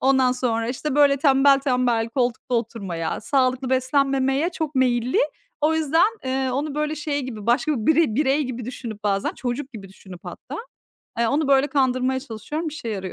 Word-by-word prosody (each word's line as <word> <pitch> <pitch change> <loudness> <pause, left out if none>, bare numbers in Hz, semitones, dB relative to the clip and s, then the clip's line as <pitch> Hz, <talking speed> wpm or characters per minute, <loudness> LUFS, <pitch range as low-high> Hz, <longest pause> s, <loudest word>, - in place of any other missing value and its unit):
ondan 260 -1 +3
sonra, 230 -3 -1
işte, 265 +3 -3
böyle, 285 -1 +5
tembel 275 0 +5
tembel 250 -4 +1
koltukta 245 0 -1
oturmaya, 200 -8 -3
sağlıklı 260 +1 0
beslenmemeye 270 +2 +1
çok 315 -4 -4
meyilli. 250 -1 +1 0.4
O 310 +2 +2
yüzden, 325 +8 +2
eee, 260 0 -1
onu, 280 +3 -2
böyle, 300 +1 -1
şey 295 -1 -2
gibi, 225 -5 -7
başka 255 +6 +2
bire 290 +2 +2
birey 285 +2 +2
gibi 250 -2 -5
düşünüp 230 -3 -7
bazen, 200 -1 0
çocuk 260 +3 -4
gibi 200 -4 -9
düşünüp 190 -1 -13
hatta, - - -8 0.6
eee, 235 - +2
onu, 290 +2 0
böyle, 275 0 +4
kandırmaya 260 -2 +1
çalışıyorum, 280 +8 -5
işe 295 -6 -7
yarıyor. 190 -4 -4
260 Hz, 165 wpm, -23 LUFS, 235-285 Hz, 0.6 s, böyle